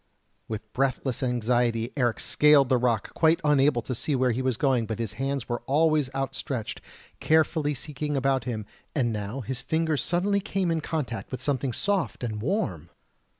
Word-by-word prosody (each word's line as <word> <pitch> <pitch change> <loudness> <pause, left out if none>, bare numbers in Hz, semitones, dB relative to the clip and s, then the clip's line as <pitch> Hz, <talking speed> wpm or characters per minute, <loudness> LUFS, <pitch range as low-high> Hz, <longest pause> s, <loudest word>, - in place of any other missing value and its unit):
With 110 -1 -6
breathless 130 -1 0
anxiety 120 -1 +1
Eric 120 -5 +1
scaled 150 -3 +5
the 130 - +3
rock, 120 -2 0
quite 165 +1 +3
unable 145 -4 +3
to 130 - -3
see 140 +4 -1
where 130 -1 +2
he 120 +3 -1
was 130 -3 0
going; 130 -5 +2
but 110 - -3
his 115 -3 -3
hands 135 -2 -1
were 120 -1 -2
always 150 0 +3
outstretched, 135 -3 -3 0.4
carefully 155 -2 +2
seeking 150 +2 -3
about 135 -2 +1
him, 110 -4 -3 0.3
and 120 -6 +1
now 105 +5 -4
his 125 +1 -4
fingers 160 -4 0
suddenly 195 +4 +1
came 195 -3 -1
in 165 -1 0
contact 150 -8 -3
with 130 - -4
something 135 -2 -1
soft 195 - -1
and 110 -3 -3
warm! 105 - -2
130 Hz, 170 wpm, -26 LUFS, 120-150 Hz, 0.4 s, scaled